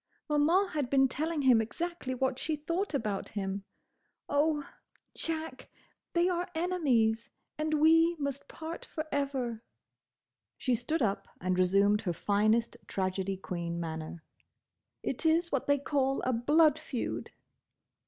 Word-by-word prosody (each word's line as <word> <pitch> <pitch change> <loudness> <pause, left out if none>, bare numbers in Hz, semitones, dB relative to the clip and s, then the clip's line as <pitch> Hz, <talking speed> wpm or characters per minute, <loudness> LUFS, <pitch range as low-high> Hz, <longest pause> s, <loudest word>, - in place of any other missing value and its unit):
Maman 325 +6 +3
had 290 -7 -2
been 270 0 +5
telling 305 +3 -2
him 250 -4 +6
exactly 260 +3 -4
what 265 0 0
she 315 - -1
thought 335 +4 -2
about 210 -6 -2
him. 195 -1 -3 0.6
Oh, 295 0 +1 0.5
Jack, 320 -4 -4 0.4
they 345 +1 +3
are 355 0 -1
enemies 260 -11 +1 0.3
and 310 0 0
we 325 +2 +5
must 280 -2 -4
part 325 +1 -7
forever." 275 -7 -3 1.0
She 255 - 0
stood 255 +6 0
up 200 -3 -1
and 185 0 0
resumed 200 +3 +4
her 180 -5 -1
finest 215 +6 +1
tragedy 190 0 -1
queen 170 -2 -4
manner. 160 0 -5 0.8
"It - - -3
is 335 +2 +3
what 275 - -1
they 285 0 +4
call 275 -1 0
a 255 - +1
blood 300 +6 +4
feud!" 265 -6 -4
275 Hz, 130 wpm, -31 LUFS, 215-315 Hz, 1.0 s, him